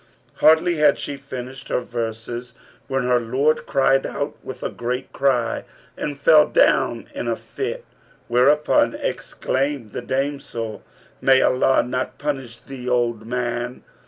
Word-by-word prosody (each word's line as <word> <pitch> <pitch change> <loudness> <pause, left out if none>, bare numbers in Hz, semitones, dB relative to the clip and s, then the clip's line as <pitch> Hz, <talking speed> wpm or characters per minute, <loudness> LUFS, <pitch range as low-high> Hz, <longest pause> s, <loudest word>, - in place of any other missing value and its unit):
Hardly 160 +2 +5
had 150 - +4
she 145 - -4
finished 135 -1 -8
her - - +1
verses, 120 +1 -5 0.3
when 135 -1 0
her 125 0 +3
lord 135 +7 +1
cried 135 -1 +3
out 145 +1 -3
with 130 -1 -8
a - - -2
great 125 +2 -4
cry 125 -4 +1 0.3
and 145 -2 -4
fell 150 +1 +6
down - - +2
in - - -4
a - - +1
fit; 475 +4 -5 0.4
whereupon 140 +5 +3
exclaimed 135 -4 -2
the - - -4
damsel, 130 -5 -3 0.4
'May 135 -1 +5
Allah 130 +1 +3
not 125 +1 -3
punish 135 -6 -4
thee, 125 +1 -7
O - - +2
old 115 -2 -1
man! 120 0 -3
130 Hz, 140 wpm, -22 LUFS, 120-140 Hz, 0.4 s, fell